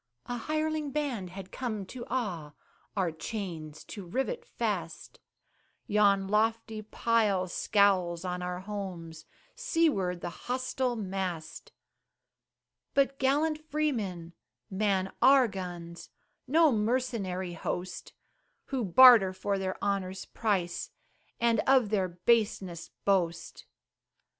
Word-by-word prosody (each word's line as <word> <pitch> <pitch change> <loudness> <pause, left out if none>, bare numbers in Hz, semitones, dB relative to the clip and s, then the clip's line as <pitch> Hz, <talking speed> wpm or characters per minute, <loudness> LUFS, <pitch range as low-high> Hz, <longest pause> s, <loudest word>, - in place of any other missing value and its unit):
A 245 - -4
hireling 310 +4 -1
band 270 -10 -2
had 190 +1 -9
come 215 -6 -4
to 240 +5 -8
awe, 175 - -3 0.4
Our 185 -4 +1
chains 160 -3 -6
to 200 - -8
rivet 265 - -2
fast; - - -4 0.7
Yon 200 -2 +3
lofty 220 +1 0
pile 215 -3 +1
scowls 185 -3 +2
on 180 0 -3
our 180 0 -4
homes, 185 -5 -6 0.3
Seaward 315 - +1
the 175 - -4 0.2
hostile 255 0 -1
mast. 190 -6 -4 1.2
But 275 -1 +2
gallant 300 +4 +2
freemen 210 - -2 0.4
man 190 -1 0
our 265 -2 +7
guns 175 -4 -7 0.4
No 315 +3 +5
mercenary 210 -6 -1
host, 180 +2 -5 0.6
Who 265 -3 -1
barter 215 -1 +8
for 195 +1 -2
their 190 -1 -3
honor's 195 -2 -2
price, 190 -6 -1 0.5
And 230 -1 +3
of 260 -5 +5
their 195 -3 +1
baseness 185 -1 0 0.2
boast. 175 -4 0
200 Hz, 105 wpm, -30 LUFS, 180-250 Hz, 1.2 s, barter